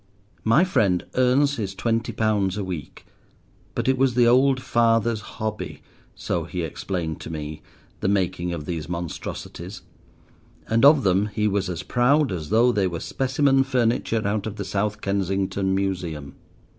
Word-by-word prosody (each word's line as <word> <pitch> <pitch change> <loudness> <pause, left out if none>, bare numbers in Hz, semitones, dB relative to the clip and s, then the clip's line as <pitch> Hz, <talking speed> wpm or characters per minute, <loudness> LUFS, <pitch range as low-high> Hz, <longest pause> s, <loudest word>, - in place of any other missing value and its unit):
My 115 +10 +5
friend 100 - +1
earns 135 +3 +3
his 100 -4 -3
twenty 115 +2 -1
pounds 105 -3 0
a 105 - -2
week, 90 -7 -7 0.7
but - - -1
it 130 -1 +2
was 130 -2 +2
the 120 -1 +5
old 130 +2 +4
father's 115 -2 +2
hobby, 110 0 -5 0.3
so 85 -2 -2
he 90 +1 -4
explained 80 0 -4
to - - -7
me, 75 -1 -6 0.4
the - - -1
making 95 -3 0
of 80 -4 -5
these 80 -2 -4
monstrosities; 85 -2 -6 0.8
and 115 +2 +2
of 145 -1 +7
them 95 +2 +2
he 105 0 -1
was 100 -2 0
as 90 0 -4
proud 135 +5 +2
as 80 -5 -4
though 115 +4 +4
they 100 -5 +1
were 85 -2 -4
specimen 135 - +2
furniture 120 -4 0
out 105 +1 -1
of 110 - -5
the 100 -2 -5
South 105 +2 -2
Kensington 95 0 0
Museum. 90 -7 -3
100 Hz, 155 wpm, -24 LUFS, 90-120 Hz, 0.8 s, of